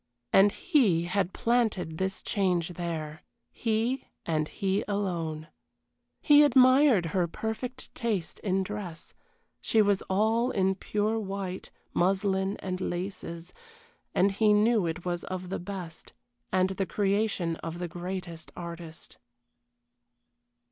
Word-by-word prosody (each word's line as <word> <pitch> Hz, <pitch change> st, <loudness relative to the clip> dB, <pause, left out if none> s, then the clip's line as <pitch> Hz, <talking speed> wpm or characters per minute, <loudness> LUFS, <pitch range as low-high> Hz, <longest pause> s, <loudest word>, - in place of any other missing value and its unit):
And 200 Hz, +1 st, +7 dB
he 240 Hz, -, +2 dB
had 180 Hz, +1 st, 0 dB
planted 215 Hz, -10 st, 0 dB
this 190 Hz, 0 st, -2 dB
change 180 Hz, -4 st, +1 dB
there 165 Hz, -3 st, -5 dB, 0.3 s
he, 230 Hz, +3 st, -1 dB, 0.2 s
and 155 Hz, -2 st, 0 dB
he 195 Hz, +3 st, -1 dB
alone. 170 Hz, -6 st, -2 dB, 0.8 s
He 295 Hz, -1 st, +7 dB
admired 255 Hz, -, +6 dB
her 180 Hz, -2 st, +2 dB
perfect 225 Hz, +7 st, -5 dB
taste 215 Hz, -8 st, -2 dB
in 190 Hz, -2 st, 0 dB
dress 190 Hz, -4 st, -6 dB, 0.5 s
she 225 Hz, -, +2 dB
was 205 Hz, -2 st, +3 dB
all 220 Hz, +5 st, +2 dB
in 190 Hz, -4 st, +2 dB
pure 210 Hz, +3 st, -1 dB
white, 195 Hz, -2 st, -5 dB, 0.2 s
muslin 190 Hz, +2 st, +1 dB
and 185 Hz, -1 st, -3 dB
laces, 175 Hz, -2 st, -5 dB, 0.6 s
and 195 Hz, +2 st, +4 dB
he 210 Hz, +1 st, +3 dB
knew 210 Hz, -2 st, +3 dB
it 165 Hz, +2 st, -4 dB
was 175 Hz, -1 st, -2 dB
of 185 Hz, -1 st, -5 dB
the 195 Hz, -, -3 dB
best, 180 Hz, -3 st, -8 dB, 0.4 s
and 185 Hz, 0 st, +2 dB
the 190 Hz, 0 st, -2 dB
creation 200 Hz, -4 st, 0 dB
of 165 Hz, 0 st, -6 dB
the 175 Hz, 0 st, -3 dB
greatest 175 Hz, -1 st, -6 dB
artist. 170 Hz, -1 st, -8 dB
190 Hz, 120 wpm, -28 LUFS, 175-210 Hz, 0.8 s, And